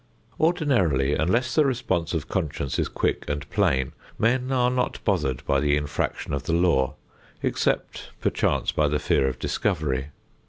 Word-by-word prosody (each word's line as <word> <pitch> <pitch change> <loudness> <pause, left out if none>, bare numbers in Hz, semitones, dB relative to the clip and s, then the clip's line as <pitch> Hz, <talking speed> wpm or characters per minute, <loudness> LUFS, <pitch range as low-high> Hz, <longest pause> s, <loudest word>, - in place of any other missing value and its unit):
Ordinarily 120 - +2
unless 115 - +1
the 155 - +5
response 110 - -1
of 80 -1 -2
conscience 75 -7 -2
is - - +1
quick - - -1
and 75 0 -3
plain, 65 -1 +1 0.3
men 125 +3 +1
are 125 -1 +3
not 125 0 0
bothered 75 - 0
by 70 - +2
the 75 +1 +2
infraction 75 -1 -2
of 70 - -1
the 80 - 0
law 85 -7 +2 0.5
except, - - -1
perchance, - - +1
by 75 - +2
the 75 +1 +1
fear 65 - +2
of 65 -1 -2
discovery. 65 -2 -1
80 Hz, 155 wpm, -25 LUFS, -, 0.5 s, the